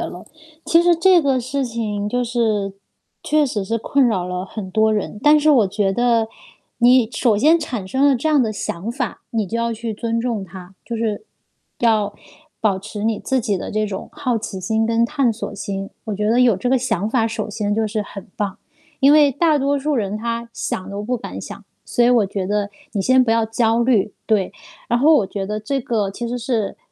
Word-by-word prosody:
了。 -, -, -6 dB, 0.4 s
其 335 Hz, +1 st, +4 dB
实 350 Hz, 0 st, +5 dB
这 355 Hz, +1 st, +5 dB
个 270 Hz, -3 st, +1 dB
事 265 Hz, +2 st, -2 dB
情 215 Hz, -4 st, -3 dB
就 245 Hz, +3 st, 0 dB
是， 220 Hz, -5 st, 0 dB, 0.5 s
确 305 Hz, 0 st, +2 dB
实 210 Hz, -6 st, -2 dB
是 230 Hz, +3 st, -1 dB
困 275 Hz, +3 st, +2 dB
扰 190 Hz, -6 st, 0 dB
了 180 Hz, 0 st, -4 dB
很 190 Hz, -1 st, -7 dB
多 220 Hz, +2 st, +3 dB
人。 210 Hz, 0 st, -2 dB
但 300 Hz, +1 st, +6 dB
是 305 Hz, +1 st, +3 dB
我 245 Hz, -8 st, +5 dB
觉 195 Hz, 0 st, 0 dB
得 230 Hz, 0 st, +2 dB, 0.5 s
你 245 Hz, -1 st, +5 dB
首 225 Hz, -1 st, +2 dB
先 310 Hz, +10 st, +5 dB
产 245 Hz, -, -4 dB
生 265 Hz, +8 st, +2 dB
了 275 Hz, -, +4 dB
这 295 Hz, +6 st, -1 dB
样 295 Hz, -4 st, +4 dB
的 220 Hz, -, -1 dB
想 200 Hz, 0 st, -4 dB
法， 245 Hz, -4 st, -4 dB
你 220 Hz, -3 st, -1 dB
就 230 Hz, -, -3 dB
要 235 Hz, 0 st, 0 dB
去 230 Hz, 0 st, -4 dB
尊 230 Hz, +2 st, -2 dB
重 230 Hz, -5 st, -2 dB
它， 185 Hz, 0 st, -12 dB
就 235 Hz, -, -4 dB
是， 220 Hz, -, -2 dB, 0.5 s
要 215 Hz, -3 st, +2 dB, 0.5 s
保 200 Hz, -4 st, +1 dB
持 210 Hz, +2 st, -6 dB
你 225 Hz, -2 st, 0 dB
自 265 Hz, -2 st, 0 dB
己 205 Hz, -3 st, -1 dB
的 -, -, -5 dB
这 215 Hz, 0 st, 0 dB
种 195 Hz, -2 st, -6 dB
好 260 Hz, -6 st, -1 dB
奇 215 Hz, -3 st, -6 dB
心 220 Hz, +4 st, 0 dB
跟 230 Hz, +1 st, +2 dB
探 270 Hz, -3 st, +1 dB
索 215 Hz, -2 st, -6 dB
心。 195 Hz, 0 st, -5 dB
我 215 Hz, -, -3 dB
觉 210 Hz, +1 st, -1 dB
得 235 Hz, +3 st, +3 dB
有 235 Hz, -6 st, +4 dB
这 245 Hz, +6 st, -2 dB
个 265 Hz, -, +4 dB
想 215 Hz, -5 st, -1 dB
法， 225 Hz, -1 st, +1 dB
首 220 Hz, -1 st, -4 dB
先 205 Hz, 0 st, -2 dB
就 220 Hz, 0 st, 0 dB
是 215 Hz, 0 st, -2 dB
很 200 Hz, 0 st, -10 dB
棒， 200 Hz, -2 st, -3 dB, 0.4 s
因 280 Hz, +1 st, +6 dB
为 295 Hz, -2 st, +6 dB
大 305 Hz, +2 st, +2 dB
多 280 Hz, +1 st, +1 dB
数 295 Hz, +2 st, -1 dB
人 210 Hz, -4 st, -1 dB
他 235 Hz, +1 st, -3 dB
想 190 Hz, -3 st, -4 dB
都 200 Hz, +1 st, -5 dB
不 250 Hz, +4 st, -1 dB
敢 -, -, -7 dB
想， -, -, -9 dB, 0.2 s
所 240 Hz, -, +1 dB
以 245 Hz, -, +5 dB
我 230 Hz, -5 st, +4 dB
觉 195 Hz, -1 st, -3 dB
得 205 Hz, 0 st, -1 dB, 0.2 s
你 200 Hz, -, -1 dB
先 255 Hz, +4 st, +5 dB
不 240 Hz, -, 0 dB
要 225 Hz, 0 st, +3 dB
焦 225 Hz, +1 st, +1 dB
虑， 225 Hz, -5 st, +2 dB
对。 205 Hz, -4 st, +1 dB, 0.4 s
然 240 Hz, -1 st, +2 dB
后 310 Hz, +5 st, +5 dB
我 215 Hz, -10 st, +3 dB
觉 195 Hz, -1 st, -4 dB
得 210 Hz, +1 st, -3 dB
这 270 Hz, +6 st, -2 dB
个 220 Hz, -5 st, -1 dB
其 235 Hz, +4 st, -5 dB
实 245 Hz, -, -2 dB
是 235 Hz, -4 st, -2 dB
225 Hz, 240 characters per minute, -20 LUFS, 205-250 Hz, 0.5 s, 但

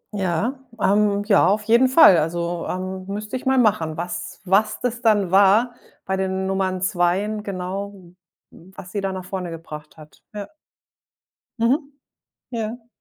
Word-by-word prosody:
Ja, 200 Hz, -, -1 dB, 0.2 s
ähm, 205 Hz, 0 st, +2 dB
ja, 200 Hz, -4 st, +4 dB
auf 210 Hz, +2 st, +1 dB
jeden 235 Hz, +4 st, +4 dB
Fall. 255 Hz, -, +7 dB
Also, 170 Hz, +2 st, -2 dB
ähm, 185 Hz, 0 st, -4 dB
müsste 210 Hz, +4 st, -5 dB
ich 260 Hz, -, -5 dB
mal 265 Hz, 0 st, +3 dB
machen, 195 Hz, -10 st, +2 dB
was 175 Hz, +1 st, -6 dB
was 200 Hz, +4 st, +2 dB
das 245 Hz, -1 st, -3 dB
dann 205 Hz, -6 st, +2 dB
war 205 Hz, +5 st, +4 dB, 0.3 s
bei 190 Hz, -, -1 dB
den 190 Hz, 0 st, -2 dB
Nummern 190 Hz, -1 st, -1 dB
2en 190 Hz, +4 st, 0 dB
genau, 195 Hz, +1 st, -5 dB, 0.6 s
was 185 Hz, +1 st, -13 dB
sie 205 Hz, -, -3 dB
da 195 Hz, -, -2 dB
nach 185 Hz, -1 st, -6 dB
vorne 185 Hz, -2 st, -5 dB
gebracht 155 Hz, -2 st, -10 dB
hat. 150 Hz, -1 st, -16 dB
Ja. 205 Hz, -1 st, -5 dB, 1.1 s
Mhm. 275 Hz, +6 st, +1 dB, 0.6 s
Ja. 230 Hz, +1 st, -5 dB
195 Hz, 150 wpm, -22 LUFS, 180-215 Hz, 1.1 s, Fall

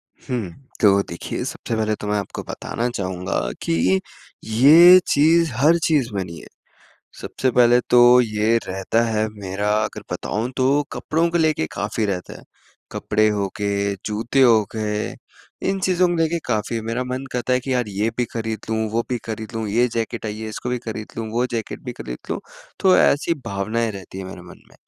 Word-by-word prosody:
हुँ, 115 Hz, -9 st, -4 dB, 0.3 s
तो 100 Hz, -2 st, +5 dB
देखिए, 85 Hz, -, -5 dB
सबसे 115 Hz, -, -4 dB
पहले 110 Hz, -1 st, 0 dB
तो 105 Hz, -, -7 dB
मैं 105 Hz, 0 st, +1 dB
आपको 100 Hz, -, -6 dB
बताना 120 Hz, +1 st, -4 dB
चाहूँगा 95 Hz, -5 st, -3 dB, 0.2 s
कि -, -, 0 dB
ये, 95 Hz, +1 st, +3 dB, 0.5 s
ये 155 Hz, +11 st, +8 dB
चीज़ 160 Hz, +1 st, +4 dB
हर 150 Hz, +7 st, +4 dB
चीज़ 145 Hz, -7 st, +2 dB
में 95 Hz, -2 st, -1 dB
नहीं 85 Hz, -2 st, -9 dB
है। -, -, -13 dB, 0.7 s
सबसे 130 Hz, -, -1 dB
पहले 120 Hz, 0 st, +5 dB
तो 125 Hz, 0 st, +7 dB
ये 110 Hz, 0 st, +1 dB
रहता 95 Hz, +5 st, 0 dB
है 110 Hz, -1 st, 0 dB
मेरा 100 Hz, 0 st, -3 dB
अगर 105 Hz, -, -6 dB
बताऊँ 115 Hz, +4 st, -3 dB
तो 135 Hz, +3 st, +3 dB
कपड़ों 165 Hz, +2 st, 0 dB
को 170 Hz, -, +1 dB
लेके 155 Hz, -, +1 dB
काफ़ी 105 Hz, +2 st, -2 dB
रहता 90 Hz, -3 st, -4 dB
है। -, -, -16 dB, 0.5 s
कपड़े 110 Hz, +1 st, +1 dB
हो 100 Hz, -2 st, -1 dB
के, 100 Hz, -1 st, -1 dB
जूते 110 Hz, +5 st, 0 dB
हो 115 Hz, -4 st, +6 dB
गए, 105 Hz, -1 st, -2 dB, 0.5 s
इन 195 Hz, 0 st, 0 dB
चीज़ों 185 Hz, -1 st, +2 dB
मे 175 Hz, -, 0 dB
देखिए 165 Hz, +1 st, 0 dB
काफ़ी 115 Hz, 0 st, -1 dB
मेरा 115 Hz, +3 st, -2 dB
मन 130 Hz, +1 st, -4 dB
करता 125 Hz, +1 st, -1 dB
है 125 Hz, -, +2 dB
कि 135 Hz, +1 st, -3 dB
यार, 125 Hz, -4 st, 0 dB
ये 105 Hz, +3 st, -1 dB
भी 125 Hz, -, +1 dB
खरीद 110 Hz, -1 st, -3 dB
लूँ, 110 Hz, -, 0 dB
वो 115 Hz, +1 st, +1 dB
भी 125 Hz, -, 0 dB
खरीद 110 Hz, +1 st, -6 dB
लूँ, 110 Hz, -1 st, -2 dB
ये 120 Hz, +4 st, +3 dB
जैकेट 115 Hz, 0 st, -3 dB
आई 105 Hz, 0 st, -5 dB
है 110 Hz, -, -5 dB
इसको 110 Hz, -, -5 dB
भी 125 Hz, -, -1 dB
खरीद 110 Hz, -2 st, -6 dB
लूँ, 115 Hz, -1 st, -4 dB
वो 120 Hz, +2 st, +1 dB
जैकेट 115 Hz, -2 st, -4 dB
भी -, -, -4 dB
खरीद 60 Hz, 0 st, -7 dB
लूँ, -, -, -1 dB, 0.4 s
तो 190 Hz, -1 st, +5 dB
ऐसी 150 Hz, +4 st, +3 dB
भावनाएँ 110 Hz, +4 st, -1 dB
रहती 95 Hz, -2 st, -9 dB
हैं 95 Hz, -, -5 dB
मेरे 95 Hz, -1 st, -9 dB
मन 90 Hz, -, -14 dB
में। -, -, -20 dB
115 Hz, 195 wpm, -21 LUFS, 105-125 Hz, 0.7 s, ये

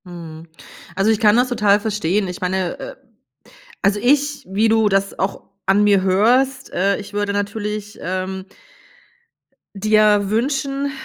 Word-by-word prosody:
Mhm. 165 Hz, -2 st, -10 dB, 0.5 s
Also, 195 Hz, +3 st, +2 dB
ich 220 Hz, -, +1 dB
kann 210 Hz, -2 st, +4 dB
das 250 Hz, +1 st, +2 dB
total 210 Hz, -4 st, +3 dB
verstehen. 210 Hz, -2 st, -1 dB
Ich 180 Hz, -1 st, -7 dB
meine, 185 Hz, -1 st, -2 dB
äh, -, -, -8 dB, 0.9 s
also 200 Hz, +1 st, +2 dB
ich, 285 Hz, +2 st, +1 dB
wie 205 Hz, +4 st, +1 dB
du 220 Hz, -1 st, +3 dB
das 195 Hz, 0 st, -1 dB
auch 190 Hz, +1 st, -2 dB, 0.2 s
an 195 Hz, +2 st, +3 dB
mir 200 Hz, -2 st, +4 dB
hörst, 250 Hz, +8 st, +2 dB
äh, 195 Hz, +2 st, +1 dB
ich 205 Hz, -, -9 dB
würde 205 Hz, 0 st, -1 dB
natürlich, 210 Hz, +1 st, -4 dB
ähm 185 Hz, +1 st, -4 dB, 1.3 s
dir 210 Hz, 0 st, +3 dB
wünschen, 275 Hz, +4 st, -1 dB
205 Hz, 140 wpm, -19 LUFS, 195-225 Hz, 1.3 s, kann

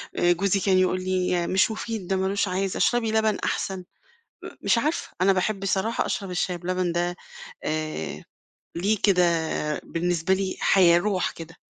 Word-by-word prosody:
آآ، 175 Hz, -, +3 dB
جوزي 195 Hz, +2 st, +1 dB
كان 190 Hz, -1 st, +2 dB
يقول 185 Hz, 0 st, +1 dB
لي: 180 Hz, -2 st, 0 dB
"مش 190 Hz, +4 st, +2 dB
مفيد، 220 Hz, -4 st, -5 dB
ده 195 Hz, -, 0 dB
ما 190 Hz, 0 st, 0 dB
لوش 200 Hz, +1 st, 0 dB
عازة، 190 Hz, +1 st, -2 dB
اشربي 235 Hz, -2 st, +2 dB
لبن 220 Hz, -1 st, +2 dB
أحسن."، 190 Hz, -1 st, -1 dB, 0.7 s
م -, -, -6 dB
مش -, -, +2 dB
عارفة 305 Hz, +7 st, -1 dB
أنا 195 Hz, +1 st, +5 dB
باحب 195 Hz, +1 st, -1 dB
الصراحة 195 Hz, +4 st, 0 dB
أشرب 195 Hz, -3 st, -3 dB
الشاي 180 Hz, 0 st, -1 dB
بلبن 180 Hz, 0 st, -1 dB
ده 175 Hz, +1 st, -1 dB, 0.5 s
آآ، 155 Hz, -, -3 dB, 0.5 s
ليه 205 Hz, +4 st, +1 dB
كده 185 Hz, -3 st, +4 dB, 0.6 s
بالنسبة 175 Hz, +1 st, 0 dB
لي 190 Hz, -1 st, -2 dB
حياة 175 Hz, -3 st, +5 dB
روح 195 Hz, -1 st, 0 dB
كده، 165 Hz, +1 st, -11 dB
185 Hz, 165 wpm, -25 LUFS, 175-200 Hz, 0.7 s, أنا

